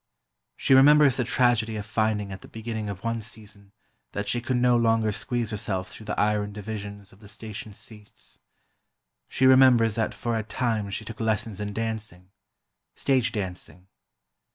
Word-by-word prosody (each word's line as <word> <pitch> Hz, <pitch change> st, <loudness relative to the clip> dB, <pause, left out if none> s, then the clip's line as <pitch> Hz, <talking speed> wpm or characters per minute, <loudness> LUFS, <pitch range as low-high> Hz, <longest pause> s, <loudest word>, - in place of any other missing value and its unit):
She -, -, +3 dB
remembers 140 Hz, 0 st, +7 dB
the 125 Hz, -, +1 dB
tragedy 120 Hz, -2 st, +2 dB
of 105 Hz, -1 st, -4 dB
finding 110 Hz, -2 st, 0 dB
at 95 Hz, -, -7 dB
the -, -, -12 dB
beginning 110 Hz, -1 st, -5 dB
of 100 Hz, -2 st, -7 dB
one 115 Hz, 0 st, -1 dB
season 105 Hz, -2 st, -9 dB, 0.4 s
that 100 Hz, 0 st, -3 dB
she 120 Hz, +4 st, 0 dB
could 125 Hz, +1 st, -1 dB
no 125 Hz, 0 st, +4 dB
longer 115 Hz, -2 st, +3 dB
squeeze 115 Hz, +2 st, -2 dB
herself 95 Hz, -3 st, -3 dB
through 110 Hz, -, -11 dB
the 105 Hz, -, -2 dB
iron 105 Hz, -1 st, +1 dB
divisions 100 Hz, -1 st, -7 dB
of 95 Hz, -, -19 dB
the 105 Hz, -, -14 dB
station 110 Hz, +1 st, -8 dB
seats. 105 Hz, +1 st, -8 dB, 0.9 s
She 130 Hz, -, +1 dB
remembers 130 Hz, -4 st, +6 dB
that 110 Hz, 0 st, -1 dB
for 120 Hz, -1 st, -2 dB
a 110 Hz, -, 0 dB
time 110 Hz, -1 st, -1 dB
she 110 Hz, +2 st, -5 dB
took 115 Hz, 0 st, -8 dB
lessons 110 Hz, -2 st, -1 dB
in 105 Hz, 0 st, -3 dB
dancing—stage 110 Hz, +4 st, -4 dB
dancing. 95 Hz, -2 st, -6 dB
110 Hz, 160 wpm, -26 LUFS, 105-115 Hz, 0.9 s, remembers